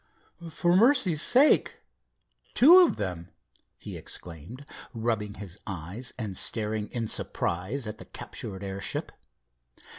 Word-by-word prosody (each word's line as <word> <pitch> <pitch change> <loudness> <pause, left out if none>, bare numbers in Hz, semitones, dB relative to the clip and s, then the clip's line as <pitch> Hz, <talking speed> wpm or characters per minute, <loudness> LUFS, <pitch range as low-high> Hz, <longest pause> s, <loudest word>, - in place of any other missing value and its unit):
"For 175 +2 +1
mercy's 210 - +4
sake, 265 - +4 0.8
two 335 +9 +8
of 360 - +4
them!" 90 -4 -5 0.5
he - - -7
exclaimed, 90 - -6 0.3
rubbing 110 -3 -2
his 100 -2 -7
eyes 100 +6 -4
and 105 -6 -5
staring 105 0 0
in 115 -3 -3
surprise 100 +8 -2
at 105 - -7
the - - -10
captured 95 -1 -7
airship. 95 0 -2
110 Hz, 115 wpm, -27 LUFS, 95-145 Hz, 0.8 s, two